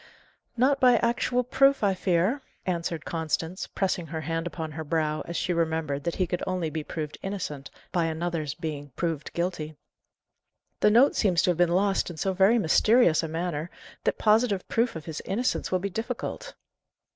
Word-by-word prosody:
"Not 270 +3 +3
by 250 -1 +6
actual 240 +2 +1
proof, 275 +1 +3
I 200 -1 +3
fear," 185 +8 +1 0.2
answered 170 -3 -2
Constance, 165 +2 -2
pressing 185 -3 -1
her 160 -1 -4
hand 165 +2 -2
upon 160 -2 -5
her 160 +1 -5
brow 155 0 0
as 170 - -3
she 180 - 0
remembered 160 -4 -1
that 170 - -1
he 185 - +1
could 175 0 -3
only 180 -4 -1
be 155 0 -3
proved 150 -1 -5
innocent 175 -8 -5 0.2
by 175 -3 +1
another's 160 -2 -2
being 145 -3 -5
proved 165 -4 -2
guilty. 170 -3 -3 1.0
"The - - +5
note 240 +6 +5
seems 180 -6 +2
to 180 - +4
have 170 - -3
been 175 -1 +4
lost 195 +3 +1
in 170 - -8
so 190 +4 0
very 195 +5 +4
mysterious 215 -1 +4
a 165 - -3
manner, 165 0 -3 0.4
that - - +1
positive 215 -3 +2
proof 230 -2 +1
of 160 -1 -7
his 160 -2 -5
innocence 235 +6 -1
will 185 - +3
be 195 +2 -4
difficult." 250 - -5
175 Hz, 180 wpm, -27 LUFS, 160-205 Hz, 1.0 s, by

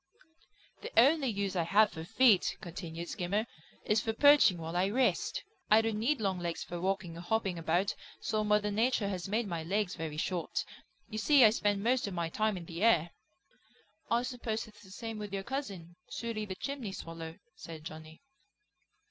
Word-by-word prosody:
"The - - -7
only 280 +3 +5
use 200 -4 -2
I 175 - +2
have 205 +6 +4
for 160 -2 -7
feet," 220 +3 +4
continued 170 -3 -7
Skimmer, 200 +4 -1 0.4
"is 215 +1 +2
for 225 - -2
perching 285 -7 +6
while 165 +1 -6
I 185 +2 +2
rest. 260 - +1 0.3
I 215 +1 +7
don't 225 -1 -1
need 270 +6 +1
long 195 -4 -1
legs 170 -1 -3
for 175 0 -6
walking 190 -2 -2
or 170 - -7
hopping 190 -1 -1
about, 175 +5 +1 0.3
so 215 -1 -1
Mother 210 0 +2
Nature 220 -1 +1
has 185 -2 -4
made 220 +4 0
my 170 -4 -3
legs 190 +3 -1
very 160 -3 -5
short. 170 0 -2 0.4
You 215 +1 -5
see 280 +3 +6
I 215 - +7
spend 205 -2 0
most 245 -1 +2
of 195 - -5
my 170 -1 -1
time 215 +3 0
in 170 - -8
the 170 +2 -7
air." 170 -8 +4 1.0
"I 235 +1 +2
suppose 240 -3 -3
it's 215 - -17
the 190 - -16
same 225 +2 -6
with 210 -1 -6
your 195 -1 -2
cousin; 195 - -5
Sooty 230 -2 -4
the 190 -2 -6
Chimney 255 -3 -5
Swallow," 165 -2 -7 0.2
said 160 -2 -9
Johnny. 160 - -10
200 Hz, 185 wpm, -32 LUFS, 175-225 Hz, 1.0 s, I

